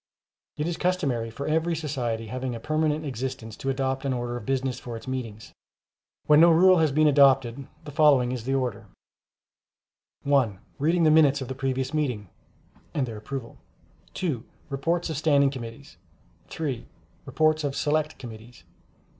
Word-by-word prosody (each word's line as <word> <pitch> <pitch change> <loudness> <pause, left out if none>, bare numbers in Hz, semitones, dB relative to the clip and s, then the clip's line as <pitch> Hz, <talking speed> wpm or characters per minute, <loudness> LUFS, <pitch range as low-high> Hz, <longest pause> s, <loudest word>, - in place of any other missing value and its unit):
It 150 - -1
is 170 0 -2
customary 140 -11 0
for 140 +5 -6
every 160 +2 +1
society 125 -8 -3
having 125 +2 -4
a - - -6
permanent 155 +3 0
existence, 125 -4 -5
to 135 - -3
adopt 135 0 -1
an 135 -2 0
order 120 -1 -3
of 120 -3 -7
business 135 -1 -1
for 120 -2 -7
its 115 - -12
meetings. 115 -5 -6 0.7
When 150 0 +6
no 170 +1 +8
rule 180 +2 +6
has 160 -3 +3
been 155 +3 +3
adopted, 135 -3 +4 0.2
the 145 - -7
following 140 -5 +4
is 125 -3 -5
the 135 +1 0
order: 125 -6 -2 1.4
(1) 135 -8 +2 0.2
Reading 165 +4 +2
the 155 - +5
Minutes 150 -3 +5
of 130 - -5
the - - -2
previous 130 0 -2
meeting 125 - -1 0.7
[and 140 - +1
their 115 -3 -7
approval]. 115 +2 -7 0.6
(2) 145 -11 -2 0.3
Reports 165 +5 -1
of 155 - -3
Standing 145 -3 +3
Committees. 115 - -9 0.5
(3) 140 -7 -4 0.4
Reports 155 0 +2
of 140 -1 -2
Select 150 +2 0
Committees. 115 -1 -11
135 Hz, 160 wpm, -26 LUFS, 120-155 Hz, 1.4 s, no